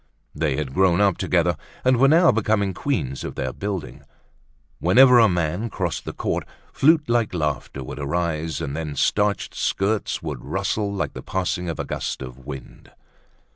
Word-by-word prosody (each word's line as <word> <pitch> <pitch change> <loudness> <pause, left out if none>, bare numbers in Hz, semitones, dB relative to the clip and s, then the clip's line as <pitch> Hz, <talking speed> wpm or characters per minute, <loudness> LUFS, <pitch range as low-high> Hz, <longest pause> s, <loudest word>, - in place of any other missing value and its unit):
They 75 -2 0
had 65 -2 -3
grown 95 0 +3
up 100 -3 +3
together 85 -1 +2 0.3
and 130 -1 +4
were 135 +3 +5
now 165 +4 +6
becoming 105 -3 +1
queens 75 - -2
of - - -6
their - - -3
building. 100 -4 -5 0.8
Whenever 125 +8 +6
a 115 -2 +6
man 90 +5 -1
crossed 90 -5 -3
the - - -4
court, - - -2 0.3
flutelike 125 - +3
laugher 75 -4 -2
would 65 - -7
arise, 80 +1 -2
and 70 +1 -3
then 75 -2 -4
starched 105 +7 +1
skirts 100 +2 -1
would - - -5
rustle 100 +2 -1
like 100 -1 -3
the - - -7
passing 90 -1 -2
of 80 - -4
a - - -2
gust - - -4
of 65 0 -9
wind. 70 -3 -9
90 Hz, 165 wpm, -23 LUFS, 75-110 Hz, 0.8 s, now